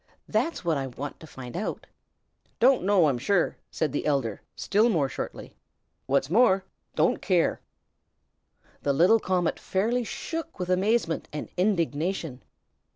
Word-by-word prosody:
That's 330 - -1
what 165 -3 +2
I 135 - -3
want 135 +3 -7
to 160 - -12
find 130 -4 -9
out." 200 +5 -3 0.7
"Don't 255 +1 +5
know, 195 -3 +4
I'm 130 -4 0
sure!" 175 +6 +1
said 155 -4 -1
the 145 - -2
elder, 135 -8 0
still 215 +4 +2
more 160 -10 +2
shortly. - - -7 0.5
"What's 135 0 +2
more, 195 - +4 0.3
don't 160 +2 +2
care!" 180 -3 +1 1.2
The 140 - +1
little 180 +10 +5
comet 180 -4 0
fairly 230 +6 0
shook 325 +7 -5
with 180 -1 -2
amazement 190 -2 +1
and 150 - -5
indignation. 170 -6 -1
175 Hz, 140 wpm, -27 LUFS, 145-205 Hz, 1.2 s, Don't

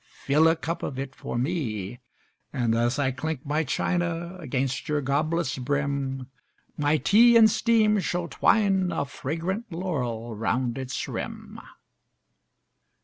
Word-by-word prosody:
Fill 150 +4 +4
a 165 - +4
cup 165 +2 -4
of 130 - -4
it 135 0 -5
for 120 - -5
me! 120 - -2 0.5
And, 120 -4 0
as 120 +3 +1
I 135 -2 +1
clink 155 +2 -4
my 150 +3 0
china 175 +1 -1
Against 130 -4 -2
your 150 -1 +1
goblet's 145 +1 0
brim, 140 -1 -2 0.5
My 150 0 +2
tea 235 +9 +5
in 225 -1 +8
steam 215 -1 +3
shall 175 -1 -2
twine 190 -2 +2
a 140 -4 -1
Fragrant 170 - -4
laurel 125 -10 -3
round 120 +3 -1
its 130 0 -4
rim. - - -6
145 Hz, 135 wpm, -26 LUFS, 130-175 Hz, 0.5 s, in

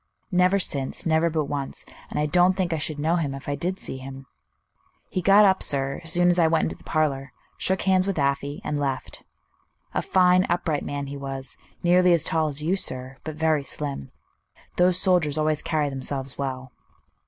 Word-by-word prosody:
"Never 180 +2 +4
since, 140 -8 -2
never 160 +1 +3
but 155 -2 -1
once; 140 -1 -5 0.2
and - - -3
I 150 - +2
don't 180 +4 +4
think 185 -2 -1
I 160 - -1
should 150 0 -2
know 160 +4 +1
him 145 -5 -2
if 135 - -10
I 145 - -1
did 180 +6 -2
see - - -6
him. 135 0 -9 0.9
He 185 - -1
got 200 +3 +6
up, 190 -1 +3
sir, 135 +1 -1
as 160 - -3
soon 175 0 +3
as 175 0 +2
I 165 - +5
went 160 0 +2
into - - -2
the - - -20
parlor, 140 -4 0 0.2
shook 190 0 0
hands 190 0 +3
with 195 - -1
Afy, 140 0 -1
and 150 -1 -2
left. 135 -2 -3 0.7
A - - 0
fine, 185 0 +4
upright 170 -4 0
man 140 0 -4
he 140 +1 -6
was, 135 -1 -6 0.3
nearly 180 +1 +5
as 170 - +2
tall 160 -1 +1
as 150 0 -3
you, 175 +5 +1
sir, 130 -7 -3
but 155 -1 -6
very 155 -2 +1
slim. 140 - -5 0.7
Those 180 0 +4
soldiers 175 -6 +2
always 155 -1 +1
carry 150 -3 0
themselves 135 0 -4
well." 130 -2 -4
155 Hz, 200 wpm, -25 LUFS, 140-175 Hz, 0.9 s, got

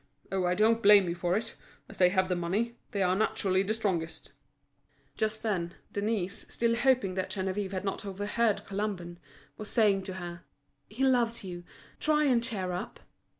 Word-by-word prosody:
Oh, 190 -1 0
I 180 0 +2
don't 225 +3 +3
blame 200 -3 +7
you 170 - -1
for 175 +2 0
it. 225 +1 -4 0.3
As - - -12
they 180 -1 +6
have 185 0 +2
the 180 - 0
money, 200 +8 -1
they 200 -2 0
are 180 0 +2
naturally 190 -2 +1
the 210 +3 0
strongest." 180 -7 -2 0.8
Just 220 0 -2
then, 180 -6 -1 0.2
Denise, 200 -1 -2
still 230 0 +1
hoping 245 -5 +2
that 185 0 -2
Geneviève 190 0 -2
had 190 +1 -3
not 195 - -2
overheard 205 +3 0
Colomban, 195 -4 -4 0.4
was 215 - -6
saying 210 -4 +3
to 190 - -5
her: 175 -1 -7 0.5
"He 235 +6 -3
loves 240 -4 +2
you. 175 -2 -7 0.4
Try 305 -1 +2
and 250 -5 +3
cheer 200 -7 -2
up." 180 +1 -5
200 Hz, 175 wpm, -30 LUFS, 185-220 Hz, 0.8 s, blame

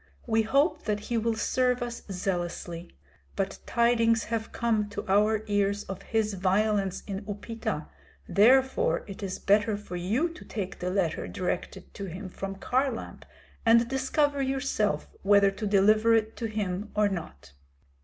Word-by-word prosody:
We 225 -1 +2
hope 275 - +1
that 210 -1 0
he 235 +3 -2
will 225 0 0
serve 250 +2 +1
us 240 -1 -5
zealously. 175 -2 -3 0.4
But 195 0 -2
tidings 230 -1 +3
have 225 0 -3
come 220 -3 0
to 205 - -5
our 210 +2 +3
ears 205 0 +1
of 195 -1 -7
his 220 -2 0
violence 195 +1 +1
in 195 0 -5
Upita, 225 +3 -4 0.4
therefore 260 +6 +4
it 195 +1 -9
is 190 -2 -3
better 205 +1 +2
for 205 -3 -8
you 215 - +1
to 335 +2 -11
take 195 -4 -5
the 180 - -2
letter 180 -4 -1
directed 180 -1 -4
to 200 - -6
him 185 +2 -7
from 195 +1 -5
Kharlamp, 255 +4 -2 0.4
and 230 0 +5
discover 275 +2 +1
yourself 265 -6 0
whether 200 0 +5
to 210 +2 -4
deliver 215 +3 +4
it 220 0 0
to 230 - -2
him 210 -1 -3
or 210 0 +4
not. 160 - -6
210 Hz, 155 wpm, -28 LUFS, 195-230 Hz, 0.4 s, and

